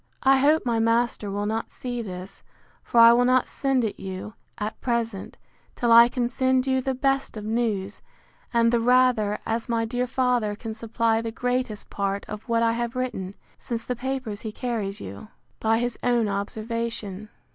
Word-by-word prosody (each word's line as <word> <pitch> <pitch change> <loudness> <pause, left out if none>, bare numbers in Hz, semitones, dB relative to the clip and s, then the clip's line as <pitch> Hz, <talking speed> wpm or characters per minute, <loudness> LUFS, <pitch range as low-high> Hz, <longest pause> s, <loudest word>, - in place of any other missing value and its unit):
I 270 0 +5
hope 300 +3 +3
my 235 -2 +1
master 230 -2 +1
will 205 +1 -2
not 220 +2 -2
see 245 -2 -5
this: 185 -2 -8 0.4
for 235 - +1
I 230 0 +9
will 245 +1 +4
not 255 +1 +3
send 270 -3 0
it 215 - -3
you, 190 +2 -6 0.2
at 210 +1 -5
present, 230 -5 -2 0.4
till 240 -1 +1
I 235 +1 +9
can 245 -1 -1
send 260 +1 +1
you 260 -1 +1
the 265 0 -1
best 270 -2 0
of 210 - -6
news; 215 -3 -1 0.5
and 230 0 +3
the 235 - +4
rather, 245 -3 +3
as 225 +1 -2
my 230 -1 +1
dear 245 +2 -1
father 245 -5 +1
can 225 +1 -6
supply 225 0 0
the 230 - -3
greatest 245 -2 -2
part 200 0 -2
of 215 +3 -8
what 230 0 +2
I 230 - +3
have 235 +1 -3
written, 205 -7 -3 0.2
since 230 -2 -4
the 250 - -3
papers 250 -4 -4
he 220 - -5
carries 210 -4 -3
you, 100 - -8 0.3
by 225 0 +2
his 240 0 -2
own 240 -3 +2
observation. 215 0 -4
230 Hz, 180 wpm, -25 LUFS, 215-250 Hz, 0.5 s, I